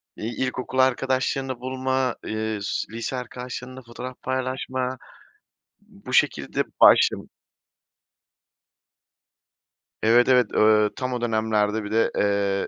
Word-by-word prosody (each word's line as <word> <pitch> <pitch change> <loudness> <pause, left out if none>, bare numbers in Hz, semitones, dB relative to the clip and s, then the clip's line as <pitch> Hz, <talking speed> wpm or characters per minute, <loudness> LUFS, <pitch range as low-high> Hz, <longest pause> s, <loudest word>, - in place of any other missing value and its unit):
iii, 115 +2 -5
ilkokul 130 0 -4
arkadaşlarını 130 0 +1
bulma, 130 0 -1
ııı, 110 0 -3
s - - -2
lise 115 +3 -4
arkadaşlarınla 125 +1 -7
fotoğraf 125 +1 -9
paylaşma, 130 0 -3 0.8
b - - -22
bu - - -6
şekilde - - +2 0.2
başlad - - +5 2.8
Evet, 120 +2 +5
evet. 125 -4 +5
Eee, 105 0 +4
tam 130 0 -3
o 125 - -3
dönemlerde 110 -2 0
bir 105 - -7
de, 115 +1 +2
eee, 100 -1 +1
125 Hz, 110 wpm, -24 LUFS, 110-130 Hz, 2.8 s, başlad